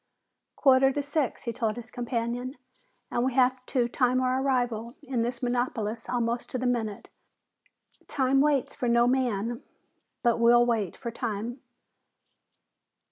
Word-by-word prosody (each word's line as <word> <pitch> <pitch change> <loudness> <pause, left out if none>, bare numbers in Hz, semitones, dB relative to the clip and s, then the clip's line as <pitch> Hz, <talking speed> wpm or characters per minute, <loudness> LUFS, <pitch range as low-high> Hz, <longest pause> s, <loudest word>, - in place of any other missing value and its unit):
"Quarter 270 -1 +5
to 290 - -1
six," 285 -1 -1
he 235 - -3
told 220 -1 -1
his 240 0 -9
companion. 245 +1 -3 0.5
"And 240 - 0
we 255 -1 0
have 255 -1 +3
to 245 -3 +1
time 250 +1 +1
our 255 0 +1
arrival 245 -3 -1
in 260 -4 -1
this 240 +1 -3
metropolis 235 -2 -1
almost 240 -1 -1
to - - -3
the 255 - -3
minute. 225 -5 -1 1.0
Time 270 0 +2
waits 285 -2 +1
for 245 - -3
no 235 0 +4
man, 240 -3 0 0.6
but 235 -1 +3
we'll 240 +1 +6
wait 220 -7 -1
for 235 -3 -5
time." 235 +2 -4
245 Hz, 140 wpm, -27 LUFS, 235-255 Hz, 1.0 s, we'll